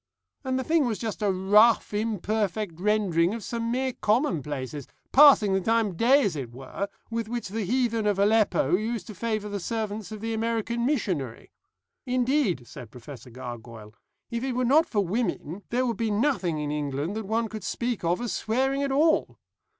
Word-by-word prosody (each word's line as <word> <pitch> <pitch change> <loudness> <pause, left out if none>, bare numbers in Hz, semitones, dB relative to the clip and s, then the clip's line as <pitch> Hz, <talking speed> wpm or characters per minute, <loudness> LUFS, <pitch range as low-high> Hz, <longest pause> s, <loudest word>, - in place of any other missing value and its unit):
And 260 -1 -1
the 260 - -1
thing 315 -2 +2
was 220 -3 -1
just 220 -2 -5
a 205 -2 +2
rough 210 +5 +4
imperfect 210 -3 -2
rendering 195 -3 +2
of 230 - -7
some 230 +1 -3
mere 260 +2 -1
commonplaces, 150 - -1 0.2
passing 265 -8 +7
the 190 - +1
time 225 +1 +2
of 175 - -9
day 265 +7 +5
as 195 -7 0
it 130 -5 -5
were, 135 +10 -5 0.2
with 230 -1 -2
which 240 -4 -4
the 215 +1 -3
heathen 230 -1 0
of 205 -2 +1
Aleppo 210 -2 +3
used 220 0 -2
to 215 - -8
favour 215 +1 -2
the 205 -1 -4
servants 215 +1 -4
of 215 - -6
the 225 +2 -3
American 230 +1 -1
missionary. 180 - -2 0.6
Indeed," 250 - +1
said 120 -1 -10
Professor 125 +1 -11
Gargoyle, 115 -3 -9 0.4
"if 235 +1 -2
it 265 -1 -1
were 250 +1 0
not 300 +6 +4
for 205 -3 0
women 190 -3 -2
there 250 +2 +1
would 235 -2 -1
be 230 -2 0
nothing 205 - 0
in 150 -1 -3
England 150 +4 -2
that 220 -2 -4
one 225 +2 0
could 215 -2 -7
speak 235 +3 -2
of 175 +5 0
as 240 - -2
swearing 265 +5 0
at 280 -1 -1
all." 310 +4 +2
215 Hz, 185 wpm, -26 LUFS, 180-235 Hz, 0.6 s, passing